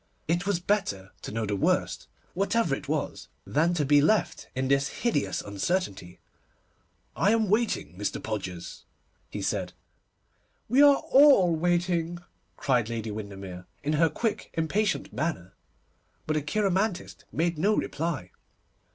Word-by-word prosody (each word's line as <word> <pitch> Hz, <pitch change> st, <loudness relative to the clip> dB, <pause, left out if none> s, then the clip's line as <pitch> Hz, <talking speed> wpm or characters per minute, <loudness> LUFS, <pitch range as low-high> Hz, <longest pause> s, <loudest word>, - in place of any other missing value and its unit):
It 175 Hz, +4 st, 0 dB
was 200 Hz, -4 st, +1 dB
better 175 Hz, -, -1 dB
to -, -, -6 dB
know 110 Hz, +1 st, -2 dB
the 105 Hz, -1 st, -1 dB
worst, 95 Hz, -, 0 dB, 0.3 s
whatever 195 Hz, -2 st, +1 dB
it 135 Hz, -, -4 dB
was, 155 Hz, -1 st, -2 dB, 0.2 s
than 165 Hz, +4 st, +1 dB
to 150 Hz, -4 st, +1 dB
be 145 Hz, +1 st, +5 dB
left 215 Hz, +8 st, +1 dB
in 130 Hz, +1 st, 0 dB
this 140 Hz, 0 st, +2 dB
hideous 230 Hz, -12 st, -1 dB
uncertainty. 100 Hz, -, -3 dB, 1.0 s
'I 200 Hz, -, +3 dB
am 220 Hz, -3 st, +1 dB
waiting, 210 Hz, -, 0 dB
Mr. 105 Hz, +2 st, -2 dB
Podgers,' 95 Hz, -5 st, -5 dB, 0.5 s
he -, -, -5 dB
said. -, -, -2 dB, 0.9 s
'We 255 Hz, +5 st, +4 dB
are 285 Hz, -1 st, +8 dB
all 265 Hz, -, +5 dB
waiting,' 175 Hz, 0 st, 0 dB, 0.4 s
cried 125 Hz, -5 st, +1 dB
Lady 115 Hz, -2 st, -3 dB
Windermere, 95 Hz, -4 st, -7 dB, 0.2 s
in 150 Hz, -, 0 dB
her 160 Hz, +2 st, +4 dB
quick, 225 Hz, +4 st, -2 dB
impatient 195 Hz, +6 st, 0 dB
manner, 155 Hz, -, -3 dB, 0.7 s
but 155 Hz, -, 0 dB
the 155 Hz, -, +1 dB
cheiromantist 195 Hz, +4 st, -1 dB
made 170 Hz, 0 st, 0 dB
no 210 Hz, +5 st, +3 dB
reply. 145 Hz, -, -2 dB
160 Hz, 135 wpm, -27 LUFS, -, 1.0 s, are